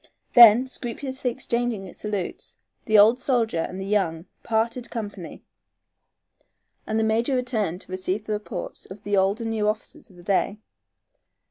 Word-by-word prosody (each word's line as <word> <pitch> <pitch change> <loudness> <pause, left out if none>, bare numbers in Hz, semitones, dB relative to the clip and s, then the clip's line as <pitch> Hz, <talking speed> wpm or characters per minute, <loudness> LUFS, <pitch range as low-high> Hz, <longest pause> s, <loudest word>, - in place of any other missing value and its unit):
Then, 240 +1 +9
scrupulously 260 +1 -4
exchanging 240 -5 -2
salutes, 205 -4 -5 0.3
the 215 -1 +4
old 220 +5 +6
soldier 235 -9 0
and 180 +3 -4
the 190 - -4
young 185 -5 0 0.2
parted 230 +2 -1
company, 205 -6 -7 1.4
and 220 +1 0
the - - +2
major 230 +5 +1
returned 220 -8 -1
to - - -13
receive 185 +3 -3
the 215 - -2
reports 210 -3 -6
of 195 +2 -11
the 205 -1 0
old 195 +4 +2
and 225 -1 -2
new 215 -2 0
officers 215 +1 -4
of 185 - -19
the 175 - -15
day. 200 +2 0
215 Hz, 150 wpm, -24 LUFS, 195-235 Hz, 1.4 s, Then